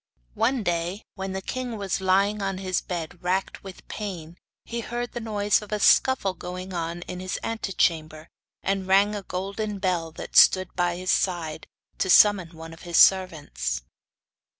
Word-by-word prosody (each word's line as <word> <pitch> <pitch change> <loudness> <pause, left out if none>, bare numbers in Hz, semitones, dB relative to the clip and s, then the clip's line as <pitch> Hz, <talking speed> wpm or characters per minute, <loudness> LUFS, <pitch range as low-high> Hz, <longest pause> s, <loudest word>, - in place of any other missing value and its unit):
One 255 - +1
day, 175 +3 -2
when 190 -1 -5
the 190 0 -4
king 250 -3 -4
was 195 -2 -2
lying 200 +3 +2
on 195 -1 -2
his 185 -1 -1
bed 175 -1 -6
racked 185 +2 -2
with 190 -2 -11
pain, 175 -6 -6 0.3
he 235 - -4
heard 240 +1 -4
the 240 - -5
noise 210 -3 +1
of 210 - -11
a 210 - -1
scuffle 205 -3 +4
going 185 +1 -7
on 170 0 -4
in 180 0 -7
his 185 0 -3
antechamber, 165 -8 -1 0.4
and 195 -1 -1
rang 200 +2 +4
a 205 - -4
golden 200 +3 -4
bell 180 -4 -1
that - - -9
stood 185 -1 +6
by 175 -1 +1
his 185 +1 -1
side 165 -4 -1 0.3
to 190 - 0
summon 185 -4 +5
one 165 0 -9
of 165 - -14
his 170 -1 -2
servants. 105 - +3
185 Hz, 170 wpm, -25 LUFS, 175-205 Hz, 0.4 s, stood